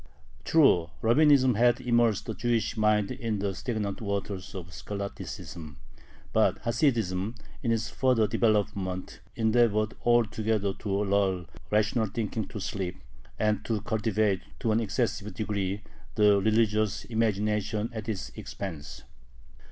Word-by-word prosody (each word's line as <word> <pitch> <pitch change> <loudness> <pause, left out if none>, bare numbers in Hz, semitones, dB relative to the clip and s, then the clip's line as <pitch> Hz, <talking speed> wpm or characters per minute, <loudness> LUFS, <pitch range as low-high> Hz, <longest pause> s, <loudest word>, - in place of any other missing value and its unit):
True, 90 - +4
Rabbinism 130 +1 +5
had 120 +1 +4
immersed 120 -4 +2
the 110 - -3
Jewish 115 +1 0
mind 105 -1 +2
in 115 -4 -2
the 100 0 -1
stagnant 105 -1 -3
waters 100 -2 -4
of 90 -1 -7
scholasticism, 85 -6 -7 0.6
but - - +3
Hasidism, 115 - 0 0.3
in 115 - 0
its 110 -2 -1
further 125 -4 +3
development, 100 -4 0 0.2
endeavored 110 -1 +2
altogether 110 -3 +2
to 100 +1 -2
lull 95 -3 +1 0.2
rational 110 +2 +2
thinking 110 +1 -3
to 110 - -7
sleep, 95 -2 -3 0.4
and 105 -1 +1
to 110 -2 0
cultivate, 110 -3 0 0.2
to 115 -4 +1
an 110 - +3
excessive 110 -1 -1
degree, 100 -2 -2 0.3
the 105 -2 +5
religious 110 -1 +1
imagination 105 0 0
at 110 0 -5
its 105 -3 -3
expense. 75 -6 -7
105 Hz, 120 wpm, -28 LUFS, 100-115 Hz, 0.6 s, Rabbinism